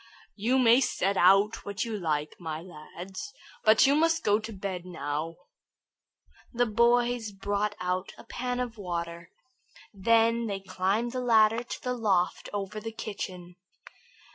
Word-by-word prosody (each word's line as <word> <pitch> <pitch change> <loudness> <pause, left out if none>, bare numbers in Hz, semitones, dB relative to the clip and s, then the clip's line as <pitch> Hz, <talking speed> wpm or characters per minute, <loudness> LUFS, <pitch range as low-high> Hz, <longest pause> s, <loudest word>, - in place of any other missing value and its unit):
"You 235 +5 +1
may 245 0 +6
set 200 -6 0
out 195 +4 +4
what 205 +3 -3
you 225 -2 -3
like, 155 -6 -2
my 160 -3 -4
lad, 175 +2 -10 0.5
but 220 0 +6
you 275 - +4
must 325 +2 +2
go 210 +1 +3
to 225 +1 -7
bed 190 -3 -5
now." 160 -2 -4 1.2
The 245 0 +1
boys 235 0 +2
brought 205 +1 -2
out 180 +1 -2
a - - -12
pan 250 0 -3
of 240 -3 -4
water. 170 -2 -5 0.6
Then 230 +3 +3
they 200 -2 -3
climbed 195 +5 -1
the 255 0 -3
ladder 225 -1 +4
to 240 - -8
the 250 - -1
loft 200 -7 0
over 205 +1 -4
the 225 +1 -6
kitchen. 185 -5 -7
205 Hz, 145 wpm, -28 LUFS, 180-230 Hz, 1.2 s, may